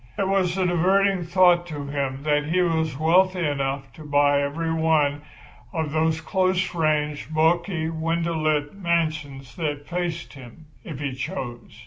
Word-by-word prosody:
It 195 Hz, -, 0 dB
was 190 Hz, -2 st, +1 dB
a 190 Hz, -, +1 dB
diverting 190 Hz, +2 st, +2 dB
thought 175 Hz, 0 st, +4 dB
to 145 Hz, -4 st, -6 dB
him 140 Hz, -1 st, -3 dB
that 150 Hz, -1 st, +1 dB
he 170 Hz, +4 st, 0 dB
was 160 Hz, -4 st, 0 dB
wealthy 180 Hz, +3 st, +3 dB
enough 135 Hz, -2 st, -2 dB
to 155 Hz, -, -12 dB
buy 145 Hz, -1 st, +3 dB
every 160 Hz, +3 st, -2 dB
one 155 Hz, -3 st, +2 dB, 0.5 s
of 160 Hz, -4 st, -2 dB
those 160 Hz, +1 st, +1 dB
close 185 Hz, +5 st, 0 dB
ranged, 150 Hz, -2 st, -1 dB
bulky, 165 Hz, +1 st, +1 dB
window 165 Hz, +1 st, -1 dB
lit 155 Hz, -2 st, 0 dB
mansions 155 Hz, -7 st, -2 dB
that 145 Hz, -4 st, -3 dB
faced 170 Hz, -1 st, -3 dB
him, 135 Hz, +3 st, -13 dB, 0.2 s
if 155 Hz, -, -7 dB
he 140 Hz, -3 st, -3 dB
chose. 130 Hz, -2 st, -6 dB
160 Hz, 150 wpm, -24 LUFS, 145-175 Hz, 0.5 s, thought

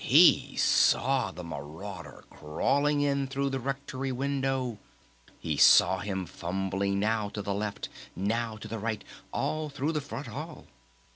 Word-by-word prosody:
He -, -, +6 dB
saw 135 Hz, 0 st, +3 dB
the 90 Hz, +3 st, -8 dB
marauder 80 Hz, +2 st, -8 dB
crawling 145 Hz, -, +1 dB
in 140 Hz, -1 st, +1 dB
through 135 Hz, +1 st, -1 dB
the 135 Hz, -, -1 dB
Rectory 135 Hz, 0 st, -3 dB
window! 135 Hz, -3 st, -1 dB, 0.6 s
He 75 Hz, -3 st, -2 dB
saw 95 Hz, +5 st, +7 dB
him 95 Hz, -2 st, -3 dB
fumbling 95 Hz, +3 st, -2 dB
now 105 Hz, 0 st, 0 dB
to 105 Hz, 0 st, -5 dB
the 100 Hz, -, -1 dB
left, 100 Hz, 0 st, -3 dB, 0.3 s
now 110 Hz, +4 st, -1 dB
to 110 Hz, -, -8 dB
the 110 Hz, +1 st, -5 dB
right, 110 Hz, 0 st, -3 dB, 0.3 s
all 155 Hz, -1 st, -1 dB
through 145 Hz, +2 st, -2 dB
the 150 Hz, -2 st, -1 dB
front 140 Hz, 0 st, -6 dB
hall! 150 Hz, +7 st, -7 dB
115 Hz, 145 wpm, -29 LUFS, 100-135 Hz, 0.6 s, saw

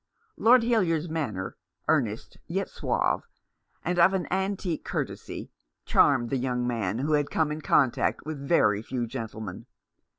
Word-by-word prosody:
Lord 240 Hz, +1 st, +5 dB
Hildyard's 175 Hz, -9 st, +1 dB
manner, 120 Hz, -13 st, -3 dB, 0.3 s
earnest -, -, 0 dB
yet -, -, -2 dB
suave, -, -, 0 dB, 0.6 s
and 175 Hz, +1 st, 0 dB
of 185 Hz, +3 st, +6 dB
an 185 Hz, -, -1 dB
antique 190 Hz, -3 st, -1 dB
courtesy, -, -, -4 dB, 0.3 s
charmed 130 Hz, -5 st, +3 dB
the 135 Hz, -, +1 dB
young 125 Hz, -1 st, -1 dB
man, 115 Hz, -4 st, -1 dB
who 145 Hz, +5 st, 0 dB
had 145 Hz, -1 st, +2 dB
come 155 Hz, -2 st, +1 dB
in 155 Hz, +1 st, -4 dB
contact 135 Hz, -3 st, +2 dB
with 155 Hz, -2 st, -5 dB
very 105 Hz, -8 st, +3 dB
few 120 Hz, +1 st, -3 dB
gentlemen. 110 Hz, -4 st, -6 dB
145 Hz, 140 wpm, -27 LUFS, 120-170 Hz, 0.6 s, of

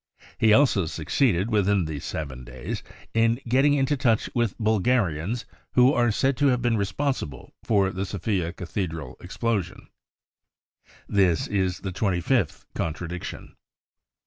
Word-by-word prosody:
He 110 Hz, -, +5 dB
also 105 Hz, -, +4 dB
succeeded, 95 Hz, -, +1 dB
within 100 Hz, -3 st, +2 dB
these 75 Hz, -3 st, -5 dB
7 65 Hz, -5 st, -5 dB
days, 60 Hz, 0 st, -6 dB, 0.3 s
in 115 Hz, +1 st, +3 dB
getting 135 Hz, +4 st, +4 dB
into 140 Hz, +1 st, +2 dB
touch 120 Hz, -5 st, +1 dB
with 120 Hz, -4 st, 0 dB
Bulgarians 110 Hz, -2 st, +1 dB, 0.3 s
who 125 Hz, +2 st, +5 dB
are 120 Hz, -3 st, +3 dB
said 135 Hz, +5 st, +1 dB
to 145 Hz, -, +3 dB
have 125 Hz, -2 st, +3 dB
been 120 Hz, -2 st, +1 dB
responsible 100 Hz, -, -2 dB
for 100 Hz, -4 st, +2 dB
the 95 Hz, +1 st, -3 dB
Sofia 95 Hz, -3 st, -1 dB
cathedral 80 Hz, -6 st, -5 dB
explosion. 100 Hz, -1 st, -3 dB, 1.2 s
This 90 Hz, -6 st, +2 dB
is 95 Hz, -3 st, -1 dB
the 95 Hz, -, -4 dB
twenty 95 Hz, -1 st, 0 dB
fifth 105 Hz, -, 0 dB
contradiction. 85 Hz, +2 st, -5 dB
100 Hz, 130 wpm, -25 LUFS, 85-120 Hz, 1.2 s, He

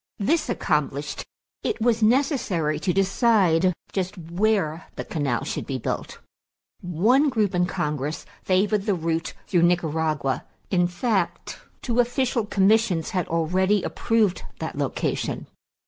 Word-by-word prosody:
This 295 Hz, +8 st, +1 dB
accomplished, 150 Hz, -, -1 dB, 0.4 s
it 440 Hz, -, -2 dB
was 230 Hz, 0 st, +2 dB
necessary 215 Hz, -, +2 dB
to 180 Hz, -, 0 dB
decide 190 Hz, -3 st, +3 dB, 0.2 s
just 190 Hz, +1 st, -2 dB
where 175 Hz, -1 st, 0 dB
the -, -, -5 dB
canal 140 Hz, -7 st, -1 dB
should -, -, -4 dB
be 135 Hz, -, -2 dB
built. 125 Hz, -, -4 dB, 0.6 s
One 220 Hz, -, +3 dB
group 215 Hz, -6 st, +1 dB
in 180 Hz, 0 st, +2 dB
Congress 150 Hz, -2 st, -3 dB, 0.2 s
favored 200 Hz, +2 st, +1 dB
the 200 Hz, -, +3 dB
route 165 Hz, 0 st, -2 dB
through 175 Hz, -3 st, +2 dB
Nicaragua; 160 Hz, -5 st, +1 dB, 0.3 s
in 175 Hz, -2 st, +3 dB
fact, 190 Hz, +1 st, -2 dB, 0.2 s
two 240 Hz, -1 st, 0 dB
official 245 Hz, -2 st, +1 dB
commissions 195 Hz, -4 st, +2 dB
had 180 Hz, -3 st, -1 dB
already 185 Hz, +5 st, +1 dB
approved 220 Hz, -5 st, +1 dB, 0.2 s
that -, -, -5 dB
location. -, -, -2 dB
185 Hz, 125 wpm, -24 LUFS, 165-220 Hz, 0.6 s, decide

